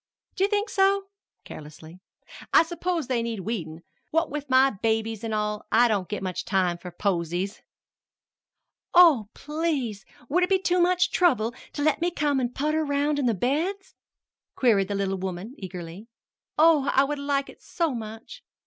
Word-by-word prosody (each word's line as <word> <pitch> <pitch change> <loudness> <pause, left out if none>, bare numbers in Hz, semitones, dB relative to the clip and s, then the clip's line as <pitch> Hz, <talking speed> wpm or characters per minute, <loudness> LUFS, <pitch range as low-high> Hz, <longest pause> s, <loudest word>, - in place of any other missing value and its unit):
"Do 380 - 0
you 400 - +3
think 415 +1 0
so?" 390 0 +2 0.4
carelessly; 155 +3 -11 0.5
"I - - +7
s'pose 340 -1 -2
they 245 -2 0
need 230 -3 -3
weedin'. 170 -6 -5 0.3
What 325 -2 0
with 290 -1 -5
my 260 +1 +5
babies 220 +1 -1
an' 225 - -3
all, 210 -1 -2
I 240 +2 +5
don't 200 -5 -1
get 210 -2 -4
much 185 -2 -3
time 185 -3 0
for 180 - -8
posies." 180 +1 -2 1.3
"Oh, 305 - +6
please, 295 -9 -2 0.2
would 345 +8 +1
it 360 - +1
be 385 - +4
too 365 -1 +1
much 360 0 +3
trouble 245 -11 +2 0.2
to 290 - -3
let 310 +1 +2
me 345 - +2
come 290 -5 0
an' 245 -2 0
putter 305 +4 0
around 290 0 0
in 265 - +1
the 230 - +2
beds?" 330 - -2 0.6
queried 210 -7 +3
the 200 - -3
little 195 -1 -1
woman 190 +5 -5
eagerly. 180 +1 -8 0.5
"Oh, 310 -3 +5
I 270 - +4
would 290 +1 -3
like 280 -1 -1
it - - -14
so 335 -5 -1
much!" 225 - -8
250 Hz, 170 wpm, -25 LUFS, 200-315 Hz, 1.3 s, I